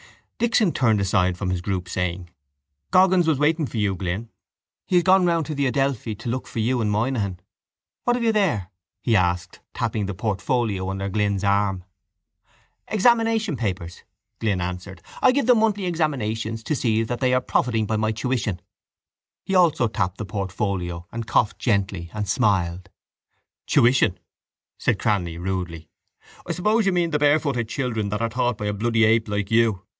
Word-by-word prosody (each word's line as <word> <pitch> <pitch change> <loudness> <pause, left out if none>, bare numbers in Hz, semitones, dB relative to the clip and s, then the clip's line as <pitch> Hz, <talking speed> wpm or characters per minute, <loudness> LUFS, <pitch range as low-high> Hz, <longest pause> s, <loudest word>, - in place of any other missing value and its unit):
Dixon 225 -5 +3
turned 115 -8 +2
aside 95 -2 +1
from 90 -1 -2
his 90 -1 -2
group, 90 -1 -3
saying: 90 -1 -3 0.6
—Goggins 185 -2 +4
was 160 -3 +3
waiting 150 +1 +1
for 120 - -6
you, 105 -2 +1
Glynn. 95 +5 -4 0.6
He 185 - 0
has 175 - +5
gone 190 +1 +5
round 165 -2 +1
to 155 - -4
the 140 -1 0
Adelphi 130 -5 -1
to 115 - -6
look 130 +2 -3
for - - -9
you 120 +2 +1
and 105 - 0
Moynihan. 105 -4 -1 0.7
What 245 - +3
have 245 - -2
you 225 - +4
there? 150 - 0 0.3
he 115 - +2
asked, 90 -2 0 0.2
tapping 110 -3 -1
the 100 - -4
portfolio 105 -1 -1
under 95 +1 -3
Glynn's 100 -1 0
arm. 100 -2 +1 1.0
—Examination 225 - +2
papers, 95 -7 -4 0.4
Glynn 100 -4 0
answered. 90 0 -6 0.2
I 260 - +6
give 275 -1 +1
them 245 -2 +5
monthly 210 -3 +1
examinations 115 -10 -2
to 155 - -1
see 115 -4 +1
that 120 +2 -4
they 130 -1 +2
are 130 - +2
profiting 115 -3 0
by 110 +1 -1
my 110 0 +1
tuition. 110 -4 -2 0.8
He 195 - -4
also 170 -10 +4
tapped 100 -3 -2
the 110 - -4
portfolio 95 -4 -3
and 115 -1 -5
coughed 110 - +1
gently 100 -6 -1
and 105 -1 -2
smiled. 95 -5 0 0.8
—Tuition! 120 -5 +3 0.6
said - - +1
Cranly 90 -6 -1
rudely. 90 -3 -4 0.6
I - - -1
suppose 210 +3 +1
you - - +4
mean 175 -2 +1
the 150 - +1
barefooted 145 -6 +2
children 115 -6 -2
that 105 +2 -2
are 115 - 0
taught 120 -1 0
by 105 - -4
a 105 - -1
bloody 115 +2 +1
ape 115 0 +3
like 105 -1 -2
you. 110 -4 +2
110 Hz, 170 wpm, -23 LUFS, 95-140 Hz, 1.0 s, I